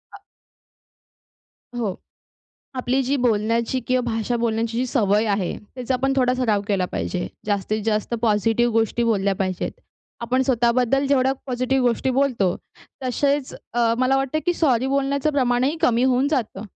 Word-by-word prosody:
अ - - -12 1.6
हो, 210 -6 -2 0.8
आपली 255 +1 0
जी 270 +3 0
बोलण्याची 230 0 +1
किंवा 255 0 +2
भाषा 225 +2 -1
बोलण्याची 230 0 -1
जी 255 - 0
सवय 215 -4 +2
आहे 200 -3 0 0.2
त्याचा 255 0 -2
आपण 270 +2 0
थोडा 250 -1 +3
सराव 230 -5 +1
केला 195 -3 +1
पाहिजे. 180 -1 -2 0.2
जास्तीत 210 +1 -1
जास्त 215 +1 -1
पॉझिटिव्ह 225 +2 +2
गोष्टी 225 +1 +1
बोलल्या 200 -4 +1
पाहिजेत. 185 -2 -2 0.5
आपण 250 +3 +1
स्वतःबद्दल 250 +2 +2
जेवढ्या 265 -1 +3
पॉझिटिव्ह 255 0 0
गोष्टी 240 +3 0
बोलतो, 250 -9 +1 0.5
तसेच 280 +2 0 0.2
अ, 230 -1 +2
मला 255 +1 +3
वाटतं 270 +3 0
की 350 - +3
सॉरी 260 -7 +2
बोलण्याचं 275 +2 0
प्रमाणही 260 +2 +1
कमी 240 -6 +3
होऊन 260 +1 +2
जातं. 240 -9 -2
245 Hz, 145 wpm, -22 LUFS, 225-265 Hz, 1.6 s, थोडा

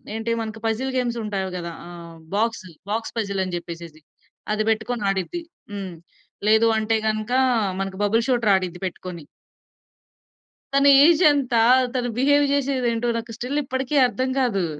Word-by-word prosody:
ఏంటి 225 +1 -2
మనకు 220 0 -6
puzzle 245 +4 -1
games 240 -2 -1
ఉంటాయివి 195 -3 -3
గదా! 170 -1 -5 0.2
ఆహ్, 170 -1 -11 0.2
బాక్సు, 225 -3 -1 0.2
బాక్స్ 225 +2 -3
పజిల్ 200 -3 -2
అని 185 - -5
జెప్పేసేసి 170 -2 -8 0.5
అది 215 0 +1
బెట్టుకొని 225 +1 -1
ఆడిద్ది. 195 - -2 0.3
హ్మ్. 195 -4 -6 0.5
లేదు 220 +1 +5
అంటే 220 +1 +1
గనక, 215 +1 -2 0.5
మనకి 195 -1 -4
బబుల్ 225 +3 +2
షూటర్ 240 -5 +2
ఆడిద్ది 180 -2 -3
పెట్టుకొని. 180 -3 -6 1.5
తన 275 0 +5 0.2
ఏజ్ 335 0 +5
ఎంత, 280 -4 0 0.4
తను 245 -1 -1
బిహేవ్ 285 +3 +4
జేసేది 275 -3 0
ఏంటో, 235 +1 -2
నాకు 230 0 -6
స్టిల్ 265 +5 -2
ఇప్పటికి 260 +1 -3
అర్థం 255 +1 -2
గాదు. 200 -8 +1
220 Hz, 145 wpm, -23 LUFS, 190-250 Hz, 1.5 s, లేదు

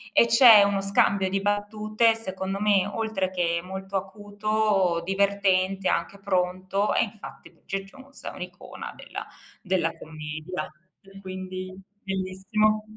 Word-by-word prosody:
E 235 - +6
c'è 230 -3 +9
uno 200 -1 +2
scambio 195 -1 +2
di 195 +1 -1
battute 215 +2 +1
secondo 195 -3 -4
me 205 -3 +3
oltre 205 -3 -2
che 170 -2 0
molto 190 +1 -7
acuto, 205 -2 0
divertente, 195 0 +1
anche 170 +4 -1
pronto, 190 +1 0
e - - +3
infatti 210 -1 -9
Bridget 195 0 -6
Jones 270 +6 -15
è - - -4
un'icona 180 0 -8
della - - -7 0.3
della 185 -4 0
commedia. 155 +3 -6 0.3
E 195 0 -15
quindi 185 -1 -6 0.3
bellissimo. 195 +3 0
195 Hz, 125 wpm, -26 LUFS, 185-205 Hz, 0.3 s, c'è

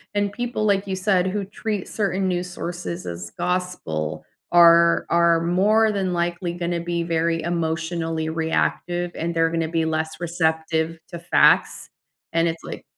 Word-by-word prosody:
and 205 -1 +1
people, 240 0 -2
like 200 -1 +1
you 190 - -2
said, 190 -1 +1
who 200 +1 -2
treat 205 0 -4
certain 195 -2 -1
news 180 0 -2
sources 175 0 -5
as 85 0 -6
gospel 170 - -2 0.3
are 170 -1 +6
are 170 -1 +3
more 205 +6 +3
than 190 -3 -1
likely 175 0 -2
gonna 175 0 -2
be 170 0 -2
very 165 0 0
emotionally 165 -1 -2
reactive, 170 +2 -1
and 170 +1 -3
they're 165 0 +2
gonna 165 -1 -1
be 165 0 0
less 160 0 -2
receptive 160 -1 -1
to 170 - -7
facts, 170 - +3 0.4
and 165 0 +2
it's 165 0 -4
like - - -7
170 Hz, 155 wpm, -23 LUFS, 165-185 Hz, 0.4 s, are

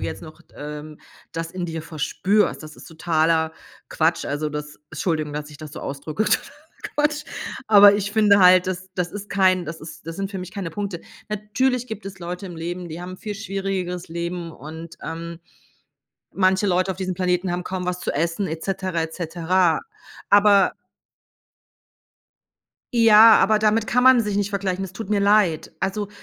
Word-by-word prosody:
jetzt - - -4
noch 155 -1 -12
d - - -28
ähm, 150 +1 -8 0.3
das 165 0 -4
in 180 -1 -4
dir 160 -1 -5
verspürst. 170 +6 0
Das 155 0 -10
ist - - -13
totaler 160 -1 +1 0.4
Quatsch. 160 +1 +1
Also 150 +1 -2
das 150 0 -7
Entschuldigung, 155 -2 -2
dass 150 0 -5
ich 150 - -13
das 155 -2 -9
so - - -7
ausdrücke: 150 +8 -3
„totaler - - 0 0.5
Quatsch“. 300 0 +1 0.4
Aber 205 -1 +8
ich 205 0 -2
finde 210 -2 +5
halt, 180 0 +7
das 185 0 -4
das 180 -1 -2
ist 205 0 -7
kein 185 -2 +3
das 160 +1 -7
ist 160 0 -11
das 165 - -6
sind 195 0 -3
für 195 - -5
mich 180 - -7
keine 195 -5 -4
Punkte. 195 -1 -4 0.3
Natürlich 230 +5 -1
gibt 220 -3 -7
es 195 -1 -8
Leute 180 +3 -6
im 175 -3 -9
Leben, 175 +2 -5
die 160 +2 -7
haben 180 +1 -7
'n - - -9
viel 210 -2 -5
schwierigeres 195 -3 -3
Leben 170 +1 -4
und, 160 +4 -10
ähm, 165 +1 -6 1.0
manche 190 +2 +2
Leute 185 +1 +1
auf 185 - -4
diesem 185 -1 -3
Planeten 180 0 0
haben 180 0 -3
kaum 185 -1 -4
was 180 0 -2
zu - - -2
essen 170 +6 -1
et 160 -1 -5
cetera, 185 -3 -2
et 160 0 -5
cetera. 175 +1 +1 0.5
Aber 200 -1 +6 2.2
Ja, 225 -1 +8
aber 215 +2 +4
damit 215 +1 +2
kann 250 - +2
man 260 -2 +7
sich 210 -2 -2
nicht 205 -1 0
vergleichen. 195 -2 -2
Es 190 -1 -7
tut 210 0 -7
mir 205 -1 +2
leid. 200 -6 +2
Also, 200 +1 -2
185 Hz, 185 wpm, -22 LUFS, 165-200 Hz, 2.2 s, Aber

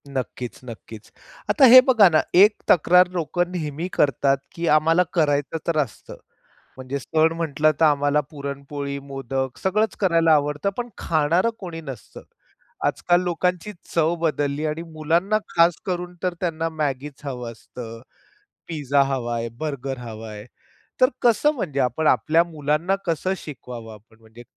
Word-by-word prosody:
नक्कीच, 125 -2 -5
नक्कीच. 115 -2 -11 0.4
आता 280 - +5
हे 255 - +13
बघा 225 -6 +6
ना, 155 -2 +3
एक 205 +4 +7
तक्रार 180 +1 +5
लोकं 175 +1 -2
नेहमी 160 -1 -4
करतात, 140 -1 +2 0.2
की 170 0 -3
आम्हाला 160 +3 +4
करायचं 145 -2 +1
तर 165 -2 0
असतं, 130 -7 -7 0.6
म्हणजे 130 +2 -5
सण 160 +4 +1
म्हटलं 155 -2 +1
तर 165 - +5
आम्हाला 145 0 +2
पुरणपोळी, 140 -1 -6
मोदक 135 -1 -4
सगळंच 215 +2 +1
करायला 165 -4 +3
आवडतं, 150 +4 +1
पण 245 0 -4
खाणारं 165 +6 +1
कोणी 170 -4 -7
नसतं. 135 -5 -10 0.6
आजकाल 175 0 +2
लोकांची 180 +2 -1 0.2
चव 165 0 +2
बदलली 150 -2 -1
आणि 155 +1 -2
मुलांना 170 +7 +1
खास 170 0 +3
करून 180 -1 -3
तर 180 -1 0
त्यांना 165 -2 -2
मॅगीच 145 -3 -4
हवं 125 -4 -5
असतं, 115 0 -10 0.7
पिझ्झा 145 -3 +1
हवा 130 -3 -2
आहे, 115 0 -2
बर्गर 140 -3 -4
हवा 115 -2 -8
आहे. 105 0 -9 0.6
तर 255 - +6
कसं 245 +5 +3
म्हणजे 145 - -3
आपण 130 +5 0
आपल्या 165 +2 +3
मुलांना 160 +2 -1
कसं 175 +2 -1
शिकवावं, 120 -8 -9
आपण 110 +1 -19
म्हणजे 110 +2 -15
150 Hz, 145 wpm, -23 LUFS, 135-170 Hz, 0.7 s, हे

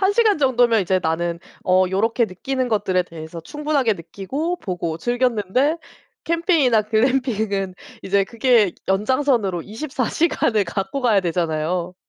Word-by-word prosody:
1 385 +1 +3
시간 430 -4 +3
정도면 245 -5 +3
이제 190 0 +1
나는 170 +1 -1 0.3
어 185 0 +4
요렇게 225 +5 +1
느끼는 255 +7 -3
것들에 200 -5 +1
대해서 165 0 -9
충분하게 290 - 0
느끼고 200 - -4
보고 170 - -3
즐겼는데 245 - +1 0.5
캠핑이나 325 - +2
글램핑은 220 -4 0 0.3
이제 195 +1 +2
그게 230 -2 +2 0.2
연장선으로 210 - +1
24 255 - -4
시간을 230 -10 +1
갖고 195 +9 -3
가야 225 -6 +3
되잖아요. 170 +1 -1
215 Hz, 315 characters per minute, -21 LUFS, 185-260 Hz, 0.5 s, 어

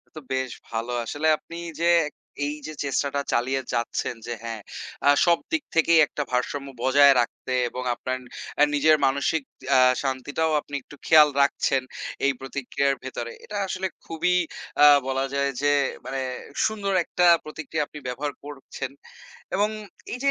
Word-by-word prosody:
তো - - -6
বেশ 130 -1 -1 0.2
ভালো। 115 +1 -3
আসলে 145 +7 -1
আপনি 170 - -12 0.3
যে - - +2 0.6
এই 145 - -2
যে, - - -5
চেষ্টাটা 140 0 0
চালিয়ে 130 +3 +1
যাচ্ছেন 120 0 -1
যে - - -4
হ্যাঁ, 115 -2 -5 0.5
আ - - +8 0.2
সব 170 -1 +5
দিক 320 -3 0
থেকেই 165 0 +5
একটা 145 - -3
ভারসাম্য 140 +3 -1
বজায় 140 +1 +7
রাখতে 120 +2 -5 0.2
এবং 125 - -5
আপনার 130 +1 -3 0.4
অ্যা 150 - +6
নিজের 155 +2 +5
মানসিক 140 +3 +1 0.3
অ্যা 130 - +6 0.2
শান্তিটাও 140 +4 -1
আপনি 145 - -8
একটু 145 - -14
খেয়াল 155 -2 +8
রাখছেন 135 -1 +2 0.4
এই 140 - +4
প্রতিক্রিয়ার 140 +1 -1
ভেতরে। 120 -2 -5
এটা 210 - -5
আসলে 190 0 -2 0.2
খুবই 165 +2 0 0.5
আ - - +11 0.2
বলা 135 0 0
যায় 140 0 +1
যে, 145 - +3 0.4
মানে 135 0 -3 0.4
সুন্দর 205 -2 -1
একটা 180 +1 +1 0.2
প্রতিক্রিয়া 155 0 -3
আপনি 150 - -10
ব্যবহার 135 +4 -3
করছেন 140 -2 -7 0.7
এবং 205 +2 +2 0.4
এই 250 - -3
যে 275 - +5
140 Hz, 155 wpm, -25 LUFS, 130-160 Hz, 0.7 s, আ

